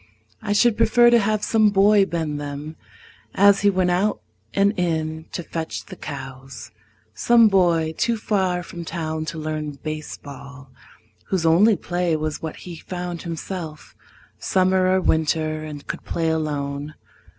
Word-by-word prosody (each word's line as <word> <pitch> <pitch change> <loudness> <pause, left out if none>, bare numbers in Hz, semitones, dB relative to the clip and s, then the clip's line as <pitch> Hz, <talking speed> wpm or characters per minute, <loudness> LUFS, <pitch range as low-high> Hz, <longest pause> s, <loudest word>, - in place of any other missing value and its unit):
I - - -3
should 230 +1 +3
prefer 240 +1 +5
to 235 - +6
have 215 0 0
some 215 -2 +3
boy 200 0 +4
bend 155 -4 -3
them 145 +2 -6 0.6
As 200 0 +5
he 205 - +4
went 185 -2 +1
out 195 +4 +1 0.3
and 200 +1 +2
in 160 -2 -2
to 175 - -4
fetch 165 0 -5
the - - -10
cows 130 -4 -8 0.4
Some 230 - +5
boy 170 -5 +2
too 235 +6 0
far 190 -4 0
from 170 0 -8
town 160 -2 -4
to 165 - -5
learn 155 -1 -4
baseball, 140 -3 -8 0.6
Whose 185 -4 -1
only 195 +7 +5
play 175 -2 -1
was 155 -1 -3
what 160 -1 -5
he 175 -2 -8
found 175 0 -6
himself, 165 -2 -7 0.4
Summer 185 0 +2
or 190 0 +3
winter, 155 -1 0
and 150 -2 -8
could - - -6
play 165 -1 -1
alone. 150 -1 -3
165 Hz, 150 wpm, -22 LUFS, 155-190 Hz, 0.6 s, to